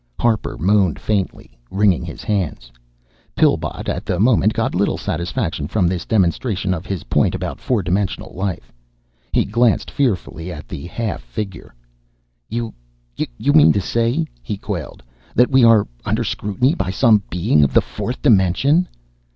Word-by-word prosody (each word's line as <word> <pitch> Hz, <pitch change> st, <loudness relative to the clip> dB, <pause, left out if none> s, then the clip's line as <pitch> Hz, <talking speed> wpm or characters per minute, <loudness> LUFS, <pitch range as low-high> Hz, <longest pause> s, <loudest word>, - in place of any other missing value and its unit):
Harper 115 Hz, -3 st, 0 dB
moaned 95 Hz, -1 st, +2 dB
faintly, 100 Hz, -, -3 dB
wringing 100 Hz, -3 st, +2 dB
his 85 Hz, -1 st, -8 dB
hands. 90 Hz, -, -2 dB, 0.6 s
Pillbot -, -, +1 dB
at -, -, -2 dB
the 90 Hz, -, -2 dB
moment 110 Hz, -1 st, +4 dB
got -, -, -1 dB
little -, -, +1 dB
satisfaction 85 Hz, -3 st, -3 dB
from 95 Hz, 0 st, +1 dB
this 85 Hz, -1 st, -2 dB
demonstration 95 Hz, 0 st, +1 dB
of 90 Hz, +2 st, -6 dB
his 95 Hz, -5 st, -3 dB
point -, -, +1 dB
about -, -, -4 dB
four 120 Hz, -6 st, 0 dB
dimensional 95 Hz, +3 st, -2 dB
life. 95 Hz, -1 st, -4 dB, 0.6 s
He -, -, +2 dB
glanced 115 Hz, +2 st, +1 dB
fearfully 90 Hz, -9 st, -1 dB
at 75 Hz, -3 st, -8 dB
the 80 Hz, -, -7 dB
half 110 Hz, +2 st, -3 dB
figure. 95 Hz, -, -7 dB, 0.7 s
"You 115 Hz, 0 st, -3 dB, 0.4 s
you 95 Hz, -, -1 dB
mean 150 Hz, -1 st, +7 dB
to 100 Hz, -, +1 dB
say," 115 Hz, -, 0 dB, 0.2 s
he 105 Hz, -4 st, -4 dB
quailed, 85 Hz, -, -6 dB, 0.3 s
"that 125 Hz, +3 st, +4 dB
we 130 Hz, -2 st, +5 dB
are 115 Hz, -3 st, +6 dB, 0.2 s
under -, -, 0 dB
scrutiny 105 Hz, -, 0 dB
by 95 Hz, -, -2 dB
some 110 Hz, +1 st, +4 dB
Being 85 Hz, -4 st, +2 dB
of 70 Hz, -, +2 dB
the -, -, +8 dB
fourth 125 Hz, -, -6 dB
dimension?" 135 Hz, -, +3 dB
100 Hz, 150 wpm, -20 LUFS, 90-115 Hz, 0.7 s, the